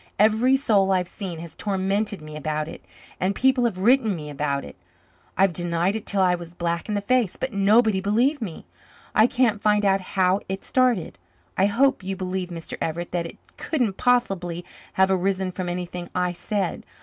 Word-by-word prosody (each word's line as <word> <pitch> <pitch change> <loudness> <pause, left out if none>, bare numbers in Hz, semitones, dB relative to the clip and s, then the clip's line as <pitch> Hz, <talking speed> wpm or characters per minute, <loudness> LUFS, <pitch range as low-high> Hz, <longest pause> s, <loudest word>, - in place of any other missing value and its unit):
"Every 220 +5 +4
soul 205 -8 +2
I've 180 -2 +1
seen 185 -3 -6
has 170 -3 -9
tormented 200 -1 -1
me 155 0 -9
about 155 0 -2
it, - - -10 0.4
and 190 +2 0
people 260 0 +3
have 220 -6 -1
written 225 +1 +3
me 150 -3 -7
about 140 -1 -2
it. - - -11 0.6
I've 190 -1 +4
denied 175 +3 0
it 220 - -5
till 195 -1 +2
I 180 -1 +4
was 170 -1 -6
black 170 +2 -2
in 210 - 0
the 205 - 0
face, 240 -2 +1
but 260 -3 -4
nobody 205 0 +4
believed 240 +9 +1
me. 185 -8 -6 0.5
I 220 - +5
can't 245 -5 +1
find 210 -1 +3
out 195 0 +3
how 185 0 +1
it 190 0 -4
started. 240 - +1 0.4
I 195 - +3
hope 265 +5 +2
you 195 +1 -3
believe, 185 -1 -3
Mr. 165 -2 -7
Everett, 170 +2 -3
that 170 -1 -1
it - - -12 0.2
couldn't 245 - -1
possibly 190 -9 0 0.3
have 190 0 +3
arisen 190 0 0
from 180 -1 -4
anything 175 0 -5
I 180 -1 +1
said. 190 +1 -3
190 Hz, 185 wpm, -24 LUFS, 175-215 Hz, 0.6 s, I